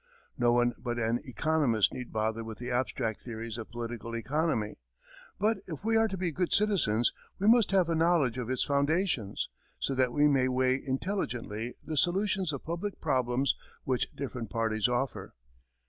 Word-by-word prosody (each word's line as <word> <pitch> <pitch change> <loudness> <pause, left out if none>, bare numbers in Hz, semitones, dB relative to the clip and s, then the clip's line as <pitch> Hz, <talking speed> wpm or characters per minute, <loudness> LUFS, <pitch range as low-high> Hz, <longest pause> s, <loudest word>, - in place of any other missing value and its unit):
No 120 -1 +3
one 120 0 +3
but 120 -1 -3
an 115 +1 +1
economist 130 -3 +2
need 125 -1 -6
bother 110 +1 -1
with 110 -1 -7
the 125 +1 -5
abstract 120 -3 -1
theories 115 -1 -6
of 110 - -7
political 115 0 -5
economy, 125 - -1 0.6
but 215 +2 +2
if 160 0 -6
we 225 0 +2
are 225 0 +5
to 195 -3 -4
be 180 -2 -1
good 180 +3 -1
citizens, 165 - +2 0.2
we 200 - 0
must 230 -1 +6
have 190 -3 +3
a 170 - +1
knowledge 160 -7 +3
of 120 -1 -4
its 130 - +1
foundations, 140 - 0 0.3
so 135 - -1
that 130 -2 +2
we 145 +3 +4
may 135 -3 +3
weigh 130 +1 +2
intelligently 125 - -3
the 155 - -3
solutions 190 +1 +2
of 140 - -5
public 170 +5 -3
problems 130 -2 +1 0.3
which 130 -2 0
different 125 -5 -5
parties 110 -2 +1
offer. 125 +2 -2
130 Hz, 170 wpm, -30 LUFS, 115-165 Hz, 0.6 s, must